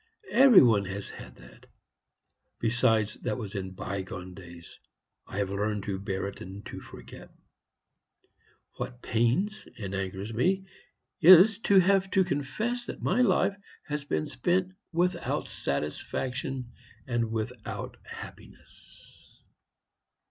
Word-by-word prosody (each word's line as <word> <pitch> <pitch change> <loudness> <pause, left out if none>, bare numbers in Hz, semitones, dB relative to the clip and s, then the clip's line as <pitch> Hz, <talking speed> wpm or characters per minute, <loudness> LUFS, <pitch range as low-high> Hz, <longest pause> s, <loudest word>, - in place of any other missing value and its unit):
every 255 - +8
one 110 -5 +4
has 100 +1 -5
had - - -11
that. - - -16 0.9
Besides, 115 -2 +2
that 105 - -2
was 105 -4 -6
in 95 -2 -4
bygone 95 -1 -5
days; 85 -2 -12 0.5
I - - -7
have 100 -1 -1
learned 105 0 -1
to 95 -1 -3
bear 95 -1 -3
it, 100 - -9
and 95 +3 -9
to - - -7
forget. 60 +1 -12 1.5
What 125 0 -6
pains 130 - 0
and 100 -4 -5
angers 95 +2 -4
me 190 - +1 0.5
is, 185 +5 +8
to 200 - +7
have 190 +1 +4
to 190 - +7
confess 215 - -2
that - - -7
my 220 +7 +2
life 195 -3 +3 0.3
has 150 -1 -3
been 80 - -1
spent 180 +8 0 0.2
without 175 +2 0
satisfaction 125 - -3 0.3
and 120 -3 -1
without 110 -1 -5
happiness." - - -13
115 Hz, 120 wpm, -28 LUFS, -, 1.5 s, every